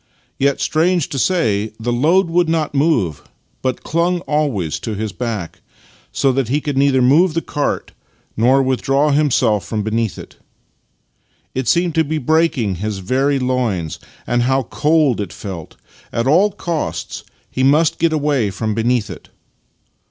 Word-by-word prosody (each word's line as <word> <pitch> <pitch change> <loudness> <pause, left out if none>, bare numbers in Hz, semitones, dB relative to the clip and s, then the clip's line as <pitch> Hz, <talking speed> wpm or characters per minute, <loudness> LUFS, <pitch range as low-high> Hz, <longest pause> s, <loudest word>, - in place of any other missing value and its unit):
Yet, 140 +1 +2
strange 170 0 +1
to 135 - -3
say, 110 - +1
the 120 +2 -1
load 165 +10 +3
would 170 0 +1
not 160 -3 0
move, 135 - +1 0.4
but 130 -1 -2
clung 170 +2 0
always 140 - -1
to 110 - -4
his 110 +1 -3
back, 105 -3 -5 0.5
so 135 - +2
that 130 -2 0
he 145 +4 +1
could 145 -2 -3
neither 135 -1 +3
move 155 +6 +4
the 165 - +1
cart 145 - -2 0.4
nor 130 +5 +3
withdraw 135 +3 +1
himself 130 -8 +2
from 110 -2 -3
beneath 110 0 -1
it. - - -11 1.2
It 130 -2 -3
seemed 170 +3 +2
to 160 - +3
be 155 +1 -2
breaking 150 - +1
his 105 +2 -3
very 135 +9 0
loins. 125 - -1 0.3
And 120 0 +1
how 130 +2 +1
cold 150 -2 +1
it 100 -5 -5
felt! 90 -6 -8 0.4
At 115 - -1
all 175 +10 +4
costs 160 - -4 0.3
he 130 - -2
must 150 +5 +3
get 165 -1 +2
away 145 -8 +1
from 110 +2 -3
beneath 115 0 0
it. 90 - -11
135 Hz, 155 wpm, -18 LUFS, 110-155 Hz, 1.2 s, move